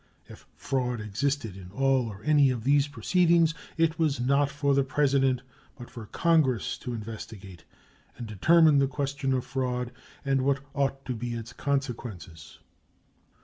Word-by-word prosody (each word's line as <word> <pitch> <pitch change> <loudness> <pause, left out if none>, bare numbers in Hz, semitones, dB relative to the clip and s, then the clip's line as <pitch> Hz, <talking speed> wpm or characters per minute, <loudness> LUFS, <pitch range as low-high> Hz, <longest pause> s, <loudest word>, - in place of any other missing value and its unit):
If - - -14
fraud 125 -3 -2
existed 110 +1 -2
in 95 -2 -11
all 135 +3 +1
or 105 -2 -9
any 145 -1 +4
of 120 -3 -2
these 140 +2 +3
proceedings, 165 +5 +2 0.2
it 165 0 +1
was 150 -5 +1
not 140 +3 +2
for 140 0 0
the 140 0 +3
President 135 -2 +1 0.3
but 120 - -11
for 115 -4 -9
Congress 155 - +1
to 125 -1 -5
investigate 105 -5 -9 0.5
and 120 - -6
determine 150 - +4
the 135 - +3
question 140 0 -2
of 130 -1 0
fraud 125 -2 -2 0.3
and 135 -1 +2
what 140 +1 +1
ought 135 -1 -1
to 130 - -2
be 120 0 -4
its 115 +1 -7
consequences. 120 - -4
135 Hz, 150 wpm, -27 LUFS, 115-140 Hz, 0.5 s, any